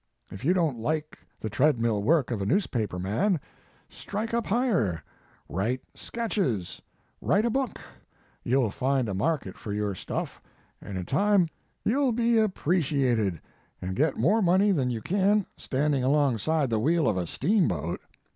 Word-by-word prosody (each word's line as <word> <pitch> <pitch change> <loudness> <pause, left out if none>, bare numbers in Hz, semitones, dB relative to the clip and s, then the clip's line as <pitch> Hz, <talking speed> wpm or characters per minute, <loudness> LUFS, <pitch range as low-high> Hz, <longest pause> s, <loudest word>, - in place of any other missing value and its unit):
If 95 - -9
you 175 +7 +3
don 165 -6 +2
t 120 - -10
like 155 +5 -2 0.2
the - - -4
tread 135 +2 +3
mill 115 -3 +1
work 145 +2 +2
of 110 -4 -2
a - - -1
newspaper 120 - 0
man, 130 - +1 0.5
strike 215 +3 -5
up 235 -2 0
higher; 180 - +1 0.4
write 115 +8 -1
sketches, 140 - -2 0.4
write 205 +4 +2
a 235 - +1
book; 265 -2 -1 0.6
you 130 +2 +2
ll 110 - 0
find 130 +1 0
a 100 - -2
market 135 - -1
for 105 - -6
your 105 -1 -1
stuff, 90 - -5 0.4
and 100 -2 -6
in 90 - -4
time 200 - +3 0.4
you 260 +6 +2
ll 260 - +3
be 235 0 +3
appreciated 140 - +1 0.4
and 95 +1 -4
get 150 +4 +1
more 200 - +3
money 190 +3 +4
than 135 -9 +1
you 115 -3 -3
can 200 +1 +2
standing 140 -1 0
alongside 140 +1 +2
the 110 - +2
wheel 160 +6 +2
of 105 - +2
a 90 -2 -2
steamboat. 125 - 0
145 Hz, 165 wpm, -27 LUFS, -, 0.6 s, money